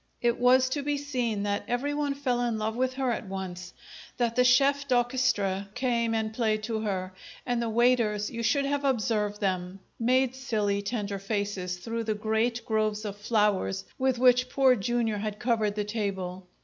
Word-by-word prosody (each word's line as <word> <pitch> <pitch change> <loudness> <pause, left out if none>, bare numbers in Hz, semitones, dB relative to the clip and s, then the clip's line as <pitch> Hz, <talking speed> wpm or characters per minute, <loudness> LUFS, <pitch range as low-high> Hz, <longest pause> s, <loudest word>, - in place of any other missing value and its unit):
It 235 -1 +1
was 255 +1 +5
to 285 +2 -1
be 290 +1 -1
seen 250 -7 -2
that 205 0 -1
everyone 285 +3 -1
fell 255 -4 0
in 235 -2 0
love 215 +1 -2
with 255 +1 0
her 260 -2 0
at 225 -2 -4
once; 185 -2 -6 0.5
that 235 -2 0
the 250 - +4
chef 275 +3 +4
d'orchestre 240 -6 +1
came 235 -3 0
and 220 0 -1
played 220 -2 0
to 220 0 -2
her; 190 -3 -3 0.3
and 245 -1 0
the 230 - -1
waiters 225 -3 +2
you 235 -2 -4
should 260 +5 +2
have 285 0 -1
observed 215 -5 0
them! 185 -1 -2 0.2
made 255 +2 +2
silly, 215 -6 -1
tender 200 -2 -3
faces 195 -3 -2
through 230 +4 -4
the 215 -1 0
great 220 +3 -1
groves 215 -1 0
of 205 -1 -4
flowers 205 -2 0
with 260 -1 +2
which 250 0 +4
Poor 265 -2 +4
Jr. 230 0 0
had 210 0 -4
covered 215 -3 0
the 210 - -1
table. 190 -4 -4
225 Hz, 175 wpm, -28 LUFS, 205-250 Hz, 0.5 s, was